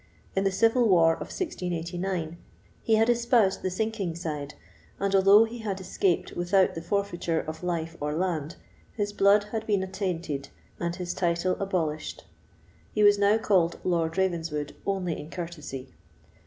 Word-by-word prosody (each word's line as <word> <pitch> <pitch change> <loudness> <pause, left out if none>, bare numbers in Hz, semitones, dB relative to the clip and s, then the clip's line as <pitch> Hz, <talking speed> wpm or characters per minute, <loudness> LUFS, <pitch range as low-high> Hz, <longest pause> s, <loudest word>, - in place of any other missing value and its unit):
In 195 0 +1
the 195 - +3
civil 225 +4 +3
war 165 -3 +5
of - - -7
1689 175 - -3 0.4
he 225 - +3
had 220 +1 +4
espoused 235 -4 +3
the 185 - -1
sinking 200 -3 -2
side, 150 -4 -5 0.4
and 200 0 0
although 195 +2 +7
he 230 +1 -5
had 200 -4 -3
escaped 185 -1 0
without 185 +2 +2
the 165 - -5
forfeiture 175 -3 -1
of 155 0 -6
life 165 -2 -2
or 150 +1 -1
land, 165 -3 -2 0.4
his 205 -2 -2
blood 200 +1 +5
had 220 -1 -3
been 200 -3 +2
attainted, 180 -7 -3 0.3
and 170 0 -2
his 180 -1 -4
title 175 +1 0
abolished. 165 -6 -2 0.7
He 210 - +3
was 205 0 +6
now 205 +2 +4
called 185 -6 +2
Lord 165 -1 0
Ravenswood 165 -5 -1
only 185 -4 -1
in 150 - -8
courtesy. 150 -7 -7
185 Hz, 155 wpm, -27 LUFS, 165-200 Hz, 0.7 s, although